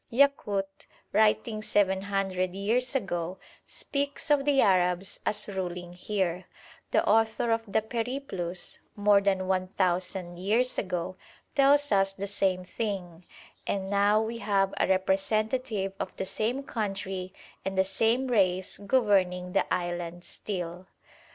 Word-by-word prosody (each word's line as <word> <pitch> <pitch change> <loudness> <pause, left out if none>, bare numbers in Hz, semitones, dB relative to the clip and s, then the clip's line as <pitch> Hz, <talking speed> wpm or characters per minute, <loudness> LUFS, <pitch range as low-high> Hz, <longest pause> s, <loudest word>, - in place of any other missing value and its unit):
Yakut, 210 -7 +1 0.3
writing 215 +1 +2
seven 190 -3 +2
hundred 190 -2 -1
years 235 +6 0
ago, 180 -6 -2 0.3
speaks 285 +2 -3
of 280 -2 +4
the 285 -2 +3
Arabs 185 -2 +2
as 210 0 +1
ruling 180 -3 -4
here; 180 -1 -2 0.4
the - - +2
author 225 +2 +3
of 225 0 +2
the 220 - +2
'Periplus' 225 -7 -3 0.2
more 205 -1 +5
than 190 -2 +1
one 185 -1 +1
thousand 180 -1 -1
years 225 +7 +1
ago 180 -1 -3 0.4
tells 285 0 +4
us 195 -1 +3
the 195 +1 -4
same 190 -2 0
thing; 185 -4 -4 0.4
and 195 0 -2
now 205 +1 +4
we 225 +1 -3
have 195 -3 +1
a - - +3
representative 195 +2 0
of 185 - -4
the 190 - -3
same 235 +8 -1
country 195 -6 -3 0.3
and 195 0 -3
the 190 - +5
same 225 +7 +1
race 190 -6 +1
governing 195 -5 +2
the - - +1
island 175 -1 -2
still. 180 -2 -5
195 Hz, 130 wpm, -28 LUFS, 185-220 Hz, 0.4 s, more